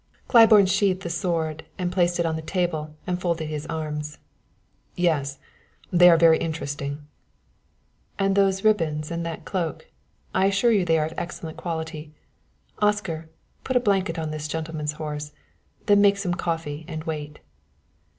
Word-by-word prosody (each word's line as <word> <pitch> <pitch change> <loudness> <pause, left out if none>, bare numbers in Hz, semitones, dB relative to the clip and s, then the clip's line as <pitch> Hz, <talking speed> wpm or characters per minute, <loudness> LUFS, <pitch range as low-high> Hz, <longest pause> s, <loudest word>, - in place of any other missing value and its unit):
Claiborne 220 -4 +7
sheathed 190 0 +1
the 170 - -3
sword, 160 -2 -2 0.3
placed 175 -1 +1
it 170 - +2
on 160 -1 0
the 160 - -4
table 160 -3 -2
and 180 0 -2
folded 170 -3 -1
his 150 0 -5
arms. 150 -1 -4 0.8
"Yes; 145 -6 0 0.5
they 180 0 +7
are 170 - +6
very 165 -1 +6
interesting." 145 -2 -4 1.1
"And 195 0 +1
those 195 -1 +2
ribbons 160 -8 +1
and 170 0 -2
that 165 - -6
cloak, 185 - -3 0.4
I 190 +1 +3
assure 200 +4 +3
you 200 -5 +3
they 165 -1 +3
are 155 - +1
of 160 - -6
excellent 165 -2 -6
quality. 160 -2 -5 0.6
Oscar, 195 -7 0 0.3
put 260 - -3
a - - +6
blanket 195 -7 +1
on 160 -1 -3
this 155 0 -4
gentleman's 155 -1 -3
horse. 150 -1 -6 0.5
Then 205 0 +5
make 200 0 +5
some 190 -3 -1
coffee 165 -3 -3
and 155 0 -5
wait." 150 -2 -5
165 Hz, 150 wpm, -24 LUFS, 155-185 Hz, 1.1 s, Claiborne